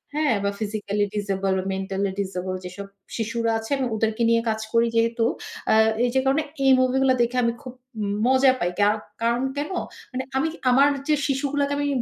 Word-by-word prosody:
হ্যাঁ? 300 Hz, -7 st, +2 dB
বা 200 Hz, -, +1 dB
physically 205 Hz, -1 st, -2 dB
disable 195 Hz, -2 st, -1 dB
বা -, -, -3 dB
মেন্টালি 195 Hz, +1 st, -2 dB
ডিজেবল 185 Hz, -1 st, -4 dB
যেসব 195 Hz, +2 st, -7 dB, 0.3 s
শিশুরা 230 Hz, +1 st, -1 dB
আছে 225 Hz, +4 st, -9 dB
আমি 265 Hz, -, -1 dB
ওদেরকে 220 Hz, +1 st, 0 dB
নিয়ে 230 Hz, 0 st, +3 dB
কাজ 220 Hz, 0 st, -1 dB
করি 230 Hz, 0 st, +4 dB
যেহেতু। 230 Hz, 0 st, +2 dB, 0.5 s
আ -, -, +5 dB, 0.3 s
এই 245 Hz, -, +2 dB
যে -, -, +5 dB
কারণে 275 Hz, +4 st, +2 dB, 0.2 s
এই 270 Hz, -, +6 dB
মুভি 255 Hz, 0 st, +2 dB
গুলা 265 Hz, -1 st, +4 dB
দেখে 240 Hz, +2 st, 0 dB
আমি 235 Hz, 0 st, +1 dB
খুব 255 Hz, -3 st, -9 dB, 0.3 s
উম 200 Hz, -, -1 dB, 0.2 s
মজা 260 Hz, 0 st, +5 dB
পাই। 175 Hz, 0 st, 0 dB
কা 205 Hz, -, +5 dB, 0.3 s
কারণ 235 Hz, +2 st, +1 dB, 0.2 s
কেন? 295 Hz, +5 st, -3 dB, 0.4 s
মানে 260 Hz, 0 st, -3 dB
আমি 295 Hz, -, +1 dB, 0.2 s
আমার 275 Hz, +3 st, +6 dB, 0.2 s
যে 305 Hz, -, +4 dB
শিশুগুলাকে 280 Hz, +1 st, 0 dB
আমি 290 Hz, 0 st, 0 dB
230 Hz, 190 wpm, -24 LUFS, 205-265 Hz, 0.5 s, এই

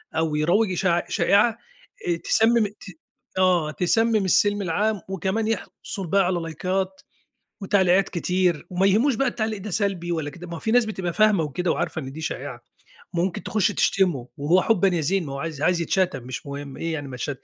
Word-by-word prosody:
أو 160 Hz, -1 st, 0 dB
يروّج 180 Hz, +7 st, +2 dB
إشاع 175 Hz, -1 st, +1 dB
شائعة 210 Hz, +3 st, +3 dB, 0.5 s
آآ، 170 Hz, -1 st, +1 dB
تسمم 225 Hz, +4 st, +3 dB
ت 205 Hz, -, -16 dB, 0.5 s
آه، 180 Hz, -4 st, +3 dB
تسمم 220 Hz, +4 st, +2 dB
السِلْم 205 Hz, +2 st, +3 dB
العام 200 Hz, +3 st, 0 dB
وكمان 195 Hz, +4 st, -1 dB
يحصل 205 Hz, -3 st, -4 dB
بيها 195 Hz, +4 st, +3 dB
على 180 Hz, -1 st, +1 dB
لايكات 185 Hz, +3 st, -3 dB, 0.6 s
وتعليقات 190 Hz, -1 st, +3 dB
كتير، 180 Hz, -2 st, 0 dB
وما 185 Hz, +1 st, +1 dB
يهموش 230 Hz, +7 st, +3 dB
بقى 275 Hz, +3 st, +1 dB
التعليق 220 Hz, -4 st, -2 dB
ده 210 Hz, -, -6 dB
سلبي 190 Hz, -3 st, -1 dB
والّا 160 Hz, -3 st, -2 dB
كده. 175 Hz, +5 st, -10 dB
ما 170 Hz, -1 st, -6 dB
في 220 Hz, -, -2 dB
ناس 245 Hz, 0 st, +4 dB
بتبقى 190 Hz, -5 st, -3 dB
فاهمة 215 Hz, -4 st, +4 dB
وكده 170 Hz, +5 st, -1 dB
وعارفة 170 Hz, -1 st, -2 dB
إن 135 Hz, -1 st, -7 dB
دي 155 Hz, +4 st, -8 dB
شائعة، 140 Hz, -6 st, -5 dB, 0.5 s
ممكن 175 Hz, 0 st, -1 dB
تخُش 215 Hz, -4 st, +1 dB
تشتمه 175 Hz, -11 st, +1 dB
وهو 160 Hz, +6 st, +3 dB
حبًا 200 Hz, -3 st, +3 dB
يا 175 Hz, -3 st, 0 dB
زين. 180 Hz, +4 st, 0 dB
ما 135 Hz, -, -5 dB
هو 140 Hz, -, -5 dB
عايز 155 Hz, -1 st, -5 dB
عايز 175 Hz, +1 st, +2 dB
يتشتم 180 Hz, -5 st, 0 dB
مش 130 Hz, +3 st, -7 dB
مهم. 140 Hz, -1 st, -7 dB
إيه 165 Hz, 0 st, -3 dB
يعني 145 Hz, -3 st, -4 dB
ما 130 Hz, -, -7 dB
اتش 125 Hz, -, -4 dB
180 Hz, 185 wpm, -24 LUFS, 165-200 Hz, 0.6 s, ناس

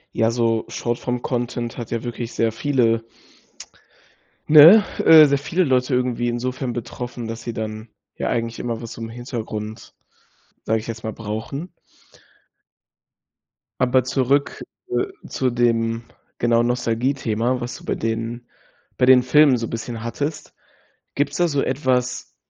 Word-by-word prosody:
Ja, 115 Hz, 0 st, +2 dB
so 115 Hz, -2 st, 0 dB
Short-Form-Content 120 Hz, 0 st, -3 dB
hat 115 Hz, -, -6 dB
ja 115 Hz, -1 st, -2 dB
wirklich 120 Hz, -1 st, -5 dB
sehr 115 Hz, -1 st, +1 dB
viele 115 Hz, -3 st, +1 dB, 1.4 s
ne, 160 Hz, +8 st, +9 dB, 0.2 s
äh, 155 Hz, -1 st, +8 dB
sehr 140 Hz, -1 st, +2 dB
viele 170 Hz, +6 st, 0 dB
Leute 130 Hz, -2 st, +1 dB
irgendwie 125 Hz, -1 st, 0 dB
insofern 125 Hz, +1 st, -3 dB
betroffen, 120 Hz, 0 st, -6 dB
dass 115 Hz, +1 st, -6 dB
sie 120 Hz, -, -4 dB
dann, 110 Hz, +1 st, -5 dB, 0.3 s
ja, -, -, -2 dB
eigentlich 115 Hz, -1 st, -2 dB
immer 115 Hz, -1 st, -3 dB
was 115 Hz, -, -8 dB
zum 115 Hz, 0 st, -7 dB
Hintergrund, 115 Hz, -2 st, -6 dB, 0.7 s
sage 110 Hz, 0 st, 0 dB
ich 110 Hz, -, -10 dB
jetzt 115 Hz, -1 st, -6 dB
mal, 110 Hz, -, -4 dB
brauchen. 115 Hz, -, -6 dB, 2.1 s
Aber 125 Hz, 0 st, +3 dB
zurück, 135 Hz, +3 st, 0 dB, 0.3 s
äh, 385 Hz, -, 0 dB, 0.2 s
zu 130 Hz, -1 st, -1 dB
dem, 115 Hz, -1 st, 0 dB, 0.3 s
genau, 120 Hz, 0 st, +2 dB
Nostalgiethema, 120 Hz, 0 st, 0 dB
was 120 Hz, -, -5 dB
du -, -, -15 dB
bei -, -, -1 dB
den 115 Hz, +2 st, -4 dB, 0.5 s
bei 125 Hz, -, +3 dB
den 130 Hz, -1 st, +7 dB
Filmen 135 Hz, 0 st, +5 dB
so 115 Hz, -1 st, -3 dB
bisschen 115 Hz, 0 st, -6 dB
hattest. 145 Hz, +6 st, -4 dB, 0.6 s
Gibt's 145 Hz, +1 st, -1 dB
da 175 Hz, -1 st, +3 dB
so 145 Hz, -2 st, 0 dB
etwas, 130 Hz, -2 st, -1 dB
120 Hz, 135 wpm, -21 LUFS, 115-130 Hz, 2.1 s, ne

